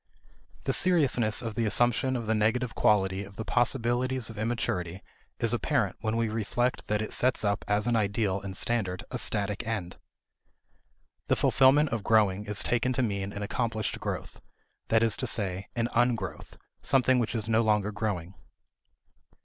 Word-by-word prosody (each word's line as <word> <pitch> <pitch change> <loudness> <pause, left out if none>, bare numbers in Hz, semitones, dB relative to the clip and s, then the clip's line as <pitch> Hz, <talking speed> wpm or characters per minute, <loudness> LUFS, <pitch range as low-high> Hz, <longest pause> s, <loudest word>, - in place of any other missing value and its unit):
The - - 0
seriousness 140 - +2
of 115 -2 -4
the 115 +1 0
assumption 120 +4 +2
of 120 -2 -3
the 110 - +1
negative 115 +3 0
quality 95 -2 +2
of 100 0 -13
the 110 - -5
possibilities 120 0 +1
of 110 - -12
immaturity 100 -6 -2 0.4
is - - +1
apparent - - 0
when 110 +1 -1
we 115 0 +1
reflect 115 +3 -2
that 105 +1 0
it - - -4
sets 125 -3 +1
up 100 -1 0
as 105 +1 +1
an 120 -1 +1
ideal 100 -2 0
and 95 -2 -6
standard 95 -7 -1
a - - -3
static 100 -1 -1
end. 100 -6 -4 1.3
The - - +3
fulfillment 140 +3 +4
of 115 -5 -3
growing 105 -2 +2
is 100 -4 +2
taken 125 +4 0
to 130 - 0
mean 100 -3 -2
an 100 0 -5
accomplished 110 0 -2
growth: - - -5 0.5
that 115 0 +3
is 115 -2 +2
to 130 - -2
say, 95 -4 -2
an 115 -1 0
Ungrowth, 120 -1 -1 0.2
something 130 -1 +3
which 120 0 -2
is 110 -1 -1
no 115 0 +3
longer 105 -2 +1
growing. 100 -4 -3
110 Hz, 165 wpm, -28 LUFS, 100-120 Hz, 1.3 s, fulfillment